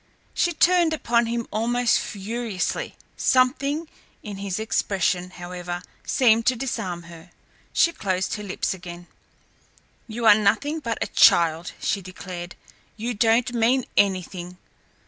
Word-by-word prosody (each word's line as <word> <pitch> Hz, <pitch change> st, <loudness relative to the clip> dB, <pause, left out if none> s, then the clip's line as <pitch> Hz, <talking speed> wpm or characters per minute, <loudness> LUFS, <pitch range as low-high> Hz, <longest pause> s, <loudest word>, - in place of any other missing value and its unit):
She 345 Hz, -, +1 dB
turned 345 Hz, 0 st, +4 dB
upon 235 Hz, -6 st, +1 dB
him 235 Hz, 0 st, -2 dB
almost 235 Hz, +3 st, +2 dB
furiously. 215 Hz, -1 st, -3 dB, 0.2 s
Something 275 Hz, +5 st, +2 dB, 0.4 s
in 205 Hz, -2 st, -7 dB
his 195 Hz, -2 st, -3 dB
expression, 185 Hz, -4 st, 0 dB
however, 175 Hz, 0 st, -6 dB, 0.2 s
seemed 230 Hz, -3 st, +3 dB
to 255 Hz, -, +4 dB
disarm 185 Hz, -9 st, -4 dB
her. 170 Hz, +1 st, -13 dB, 0.4 s
She 335 Hz, -, +3 dB
closed 190 Hz, -, -2 dB
her 210 Hz, -, -4 dB
lips 195 Hz, -1 st, -2 dB
again. 175 Hz, -1 st, -9 dB, 1.0 s
"You 230 Hz, +1 st, -4 dB
are 215 Hz, -, +9 dB
nothing 220 Hz, +9 st, +1 dB
but 230 Hz, -6 st, -3 dB
a -, -, -2 dB
child!" 165 Hz, 0 st, +4 dB
she 200 Hz, -, -1 dB
declared. 180 Hz, -1 st, -8 dB, 0.4 s
"You 235 Hz, +3 st, -3 dB
don't 230 Hz, +2 st, +2 dB
mean 240 Hz, +2 st, +2 dB
anything. 185 Hz, -2 st, 0 dB
215 Hz, 125 wpm, -24 LUFS, 180-240 Hz, 1.0 s, are